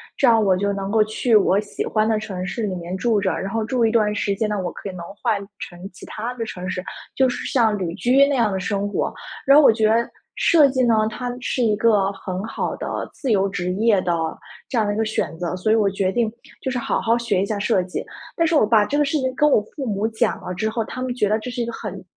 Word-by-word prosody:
这 270 - +3
样 225 -2 +5
我 190 -2 +3
就 200 +2 0
能 195 0 -4
够 220 -1 +4
去 220 +2 +1
我 200 -1 +4
喜 210 - -5
欢 215 0 +1
的 220 -1 +1
城 185 -4 -5
市 195 +5 -4
里 195 -3 -2
面 175 +1 -5
住 225 -1 +1
着， 190 -1 0
然 195 - -4
后 225 0 -1
住 245 +1 0
一 - - +3
段 210 -3 +2
时 200 -1 -1
间 215 +2 -1
呢， 210 - -1
我 175 - -3
可 200 - -7
以 - - -5
能 175 - -7 0.2
换 210 - +1 0.2
成 175 -3 -9
其 - - -12
它 225 +3 -5
的 230 -2 -3
城 185 -3 -6
市， 185 -1 -3 0.3
就 265 -1 +4
是 - - -4
像 225 -5 +3
旅 175 -3 -3
居 270 +3 +4
那 285 - 0
样 230 -5 +2
的 190 - -2
生 200 +1 -1
活。 205 - -1 0.3
然 275 +1 +7
后 305 - +7
我 - - +8
觉 220 -1 +2
得 230 +2 +2 0.3
设 310 -4 +5
计 260 -1 +1
呢， 235 -2 +4 0.2
它 245 +2 -4
是 250 0 -1
一 215 -2 +3
个 210 -4 +3
很 190 0 -5
好 225 - -3
的 - - -4
自 265 - -3
由 200 -2 +3
职 180 -2 -3
业 210 -2 +3
的 180 - -1 0.6
这 245 - -3
样 220 - +3
的 205 - 0
一 - - -4
个 220 - +1
选 165 -7 -2
择， 175 0 -2
所 185 +4 0
以 220 - +5
我 210 -3 +3
决 195 -1 -1
定， 235 +1 +1 0.3
就 - - -2
是 250 - -2
好 240 - -1
好 230 +1 +2
学 235 -6 0
一 - - +1
下 210 0 -2
设 205 -3 +2
计。 180 - -5 0.3
但 335 - +2
是 330 - +1
我 290 - +5
把 215 -2 +4
这 285 - -1
个 295 - +3
事 285 +2 0
情 260 -1 -1
跟 300 +3 +4
我 220 - +4
父 280 - -4
母 210 -2 -1
讲 220 -1 -1
了 180 - -5
之 215 +4 -1
后， 225 0 -2
他 255 - -7
们 255 -1 -2
觉 210 -5 +1
得 215 +1 +2
这 235 - -6
是 245 0 -3
一 - - 0
个 235 - -4
很 200 -4 -7
215 Hz, 305 characters per minute, -22 LUFS, 195-235 Hz, 0.6 s, 我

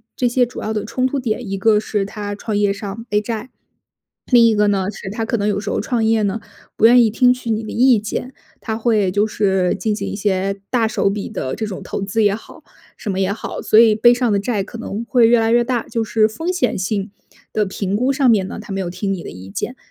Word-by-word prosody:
这 250 - +1
些 245 +1 +2
主 245 - -8
要 220 - -3
的 210 -2 -2
冲 255 +4 0
突 275 +1 -2
点， 235 -1 -3
一 195 - -2
个 210 +2 +3
是 210 -1 -2
他 205 0 -5
创 210 +1 -4
业 205 -1 +2
上 205 +2 -7
背 210 - +2
债， 225 +2 -5 0.8
另 240 -2 +7
一 225 - +3
个 210 0 +3
呢， 195 -2 +1
是 195 - -8
他 225 +3 -3
可 230 - -1
能 205 -1 -1
有 205 -1 0
时 205 0 -5
候 - - -1
创 240 -3 -1
业 220 0 +2
呢， 205 +2 -1 0.4
不 - - +3
愿 240 +1 +7
意 225 - +3
听 250 +3 +4
取 250 -2 -7
你 220 +1 -1
的 215 - -6
意 245 -1 +4
见， 215 +5 -5 0.3
他 220 -1 -3
会 220 -4 +2
就 205 +2 +2
是 190 -4 +1
进 215 -2 -1
行 - - -4
一 - - -4
些 195 -1 -1
大 235 -3 +2
手 215 -2 +1
笔 200 0 -3
的 135 -11 -4
这 220 - -3
种 195 - -6
投 - - -5
资 205 +3 0
也 205 -1 +3
好、 220 - -13 0.3
什 210 - -4
么 190 - -2
也 195 +1 +1
好， 220 - -6
所 215 - +4
以 225 -2 +6
背 240 +3 +6
上 245 -2 0
的 200 - +2
债 205 -1 -1
可 225 - -10
能 225 -1 -5
会 240 -1 +4
越 235 0 +5
来 225 0 +1
越 240 +1 +4
大。 240 -1 -1
就 230 - -1
是 215 0 +2
风 325 +12 -3
险 365 - 0
性 195 +1 -2 0.4
的 215 - +1
评 195 0 -3
估 250 +5 +1
上 270 -2 +3
面 195 -4 +2
呢， - - -7
他 195 - -8
没 195 - -2
有 180 - -3
听 195 +2 -2
你 180 -3 -6
的 - - -7
意 95 +1 -11
见。 245 - -4
215 Hz, 285 characters per minute, -19 LUFS, 200-235 Hz, 0.8 s, 另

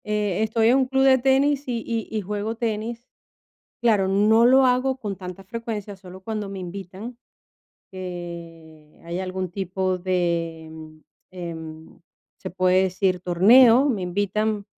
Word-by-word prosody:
Eh, 210 -2 -1
estoy 220 +1 +2
en 255 - +5
un 265 - +2
club 265 +1 +1
de 265 -1 +5
tenis 275 +2 +2
y 235 -2 -3
y 230 -2 -3
y 215 - 0
juego 210 +3 -4
tenis. 230 +1 -4 0.8
Claro, 215 -5 +3
no 210 +4 +4
lo 260 +2 +6
hago 255 +1 +1
con 210 -6 -5
tanta 185 0 -9
frecuencia, 210 0 -6
solo 185 0 -12
cuando 210 0 -4
me 195 -1 -7
invitan, 195 +6 -8 0.7
que 170 -4 -9
haya 175 +2 -4
algún 185 -1 -4
tipo 185 0 -2
de, 170 -3 -2 0.6
em, 160 -3 -9 0.4
se - - -7
puede 185 +1 +2
decir 185 0 0
torneo, 225 +9 +6
me 215 -7 -1
invitan, 205 +3 -1
195 Hz, 140 wpm, -23 LUFS, 180-230 Hz, 0.8 s, lo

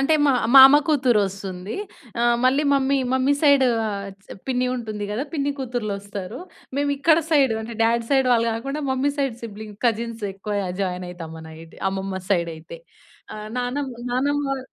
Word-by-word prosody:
అంటే 275 +4 +3
మా 275 - +4 0.2
మామ 270 +1 +10
కూతురోస్తుంది. 200 - 0 0.5
ఆ! - - +2 0.2
మళ్ళీ 270 +3 +3
మమ్మీ 275 0 +2 0.2
మమ్మీ 260 +2 +2
సైడు 280 -3 +5 0.2
ఆహ్, 200 -1 -4 0.2
చ్ - - -22 0.2
పిన్ని 255 -1 0
ఉంటుంది 215 -4 -5
గదా! 225 +7 -2
పిన్ని 285 -2 0
కూతుర్లొస్తారు. 210 -5 -4 0.4
మేము 285 0 +1
ఇక్కడ 310 +3 +4
సైడు 275 -7 +4
అంటే, 225 +1 -7
డాడ్ 230 0 +2
సైడ్ 265 -2 +3
వాళ్ళు 230 -1 +3
కాకుండా 275 +6 -4
మమ్మీ 265 +2 +1
సైడ్ 270 -5 -1
సిబ్లింగ్‌ 215 -2 -8
కజిన్‌స్ 230 -1 -2
ఎక్కువ 205 +2 -5 0.2
జాయినైతాం 180 -3 -4
మనైతే. 160 0 -12
అమ్మమ్మ 190 0 -4
సైడైతే. 170 - -2 0.6
ఆ! - - -7 0.2
నాన్నమ్మ 250 +1 -3 0.2
నాన్నమ్మ 275 +2 0
235 Hz, 145 wpm, -23 LUFS, 200-275 Hz, 0.6 s, మామ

